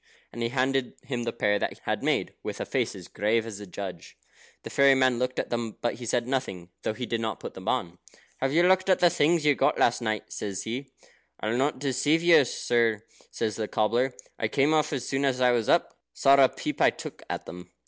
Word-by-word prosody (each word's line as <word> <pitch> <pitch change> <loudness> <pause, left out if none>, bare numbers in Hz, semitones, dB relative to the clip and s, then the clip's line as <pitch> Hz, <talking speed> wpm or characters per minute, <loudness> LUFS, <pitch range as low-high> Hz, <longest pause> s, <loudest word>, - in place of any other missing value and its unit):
And 120 - -6
he 115 - 0
handed 130 0 0
him 125 -3 -3
the 115 - -1
pair 105 -2 +1
that - - -2
he - - -20
had - - -2
made, - - 0
with - - -6
a - - -2
face - - -1
as - - -10
grave 110 +2 0
as 105 -3 -7
a 105 - -9
judge. 90 -2 -8 0.5
The - - -7
fairy 140 -1 +5
man 130 -2 +2
looked 125 0 -2
at - - -3
them, 115 -2 -3
but 120 - -1
he 120 -1 -8
said 120 +1 0
nothing, 110 -10 -3
though 110 - -2
he 125 - -4
did 115 -1 -2
not 110 -2 -3
put - - -7
them 95 +2 -10
on. 90 -9 -1 0.4
"Have 135 0 -1
you 165 +4 +4
looked 185 +1 +3
at 185 - +5
the 175 -1 +4
things 155 +1 +2
you 150 - +5
got - - +1
last 120 - +2
night?" 110 -2 -3
says 100 -2 -4
he. 130 +5 -5 0.5
"I'll 110 +2 -1
not 135 +3 +1
deceive 140 +4 +1
you, 165 -5 +6
sir," 115 -3 0 0.3
says 110 -2 -3
the 110 -1 -2
cobbler. 120 +6 +1 0.2
"I 110 - +1
came 140 +7 +2
off 155 -1 +2
as 130 -4 -3
soon 135 +1 -1
as 135 -2 +1
I 125 -1 +4
was 120 -3 0
up. - - +2
Sorra 135 -1 +5
peep - - -5
I - - +7
took - - -8
at - - -4
them." 90 0 -10
125 Hz, 235 wpm, -27 LUFS, 110-135 Hz, 0.5 s, I